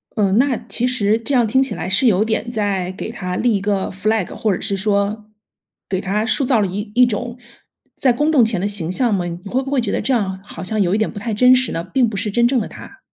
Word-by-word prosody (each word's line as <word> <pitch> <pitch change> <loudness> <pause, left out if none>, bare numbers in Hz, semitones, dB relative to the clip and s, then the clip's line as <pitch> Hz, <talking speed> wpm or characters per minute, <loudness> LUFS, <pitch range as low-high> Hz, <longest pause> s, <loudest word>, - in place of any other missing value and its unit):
嗯， 200 -1 +2
那 265 0 +3
其 245 - +1
实 220 -4 +1
这 230 +5 -4
样 240 -3 +3
听 260 +5 +2
起 270 - 0
来 180 - -4
是 195 +7 +2
有 210 -2 +4
点 225 +1 -2
在 200 -4 -1
给 205 +4 -6
他 180 -5 -5
立 235 0 +1
一 - - -6
个 200 -2 -1
flag， 205 +1 -1
或 215 -3 0
者 - - -7
是 195 - -2
说 205 +1 0 0.6
给 185 -1 -1
他 200 +3 -1
塑造 240 +1 +2
了 200 - +1
一 205 +3 -5
一 250 +1 +6
种 240 +2 -3 0.6
在 255 -3 +2
公 295 +5 +1
众 255 -7 +5
前 210 -5 -1
的 200 - 0
形 180 -5 +1
象 240 +3 +1
吗？ 180 -3 0
你 170 0 -5
会 260 +2 0
不 270 - -6
会 265 -3 +2
觉 210 - -2
得 - - 0
这 260 +5 0
样 190 -5 -1
好 185 -4 -9
像 215 +3 -2
有 185 -1 +2
一 - - +2
点 220 - 0
不 205 - -11
太 220 +1 -3
真 250 +4 +6
实 255 0 0
呢？ 165 - -3
并 235 +7 +1
不 215 - -5
是 210 +2 -2
真 235 +3 +3
正 255 -1 +1
的 205 - -3
他。 - - -12
215 Hz, 305 characters per minute, -19 LUFS, 195-245 Hz, 0.6 s, 一